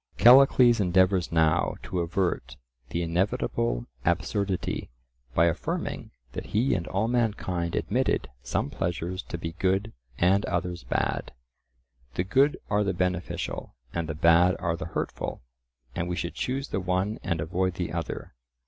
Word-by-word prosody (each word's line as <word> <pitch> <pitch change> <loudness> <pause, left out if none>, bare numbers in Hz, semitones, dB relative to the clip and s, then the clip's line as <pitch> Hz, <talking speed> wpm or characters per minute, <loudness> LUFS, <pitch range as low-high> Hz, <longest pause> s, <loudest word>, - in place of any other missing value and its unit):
Callicles 125 0 +7
endeavours 95 -1 +3
now 80 -1 +2
to 90 - -3
avert 85 -8 -1 0.3
the 85 - -1
inevitable 95 - 0 0.2
absurdity 95 +2 -1 0.5
by 85 - +5
affirming 85 - -2 0.2
that - - -6
he 125 +5 +3
and 85 -2 -1
all 100 +4 0
mankind 105 -8 0
admitted 125 - 0
some - - -2
pleasures 90 +2 -2
to 85 - -6
be 80 0 -4
good 95 +4 +1 0.2
and 95 +3 +3
others 90 -2 -2
bad. - - -1 0.8
The 90 - +1
good 135 +10 +3
are 105 0 +2
the 95 -2 -1
beneficial, 90 -7 -2 0.2
and 85 -2 -2
the 80 - -3
bad 85 +3 +5
are 85 -1 -1
the 80 - -5
hurtful, 85 - -4 0.5
and 85 +1 -2
we 90 - -1
should 85 0 -3
choose 135 +2 -2
the - - -1
one 95 +4 -1
and 85 - -1
avoid 90 +3 -1
the 90 -3 -3
other. 85 -1 -4
90 Hz, 145 wpm, -27 LUFS, 85-100 Hz, 0.8 s, Callicles